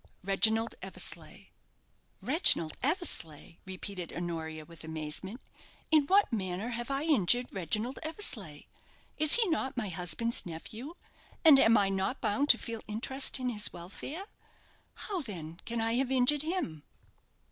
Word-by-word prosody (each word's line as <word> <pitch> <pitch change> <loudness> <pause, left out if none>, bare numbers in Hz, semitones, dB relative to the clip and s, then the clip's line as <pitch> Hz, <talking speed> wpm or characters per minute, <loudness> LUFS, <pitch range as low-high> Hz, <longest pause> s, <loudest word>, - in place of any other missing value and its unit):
"Reginald 220 +4 +2
Eversleigh." - - -4 0.7
"Reginald 255 - +3
Eversleigh!" 255 - 0
repeated 185 -2 -6
Honoria, 160 -2 -5
with 165 -2 -13
amazement. 160 +8 -5 0.5
"In 305 -3 +4
what 390 -8 +4
manner 190 +1 -2
have 240 +1 -4
I 275 +1 0
injured 245 - +3
Reginald 210 - -2
Eversleigh? 325 +6 -4 0.6
Is 310 -1 +7
he 460 -3 +2
not 270 -3 -2
my 215 -5 -2
husband's 180 +7 +2
nephew, 220 - -8 0.5
and 295 -4 +9
am 225 -2 +5
I 200 -1 +2
not 190 0 -2
bound 275 +8 0
to 240 - +8
feel 230 -2 -6
interest 265 +6 0
in 255 -1 -1
his 210 -3 0
welfare? 200 - -7 0.7
How, 390 -4 -4
then, 170 - -8
can 235 0 -3
I 225 0 0
have 255 +1 0
injured 265 +3 +3
him?" 310 - -3
225 Hz, 135 wpm, -30 LUFS, 180-275 Hz, 0.7 s, and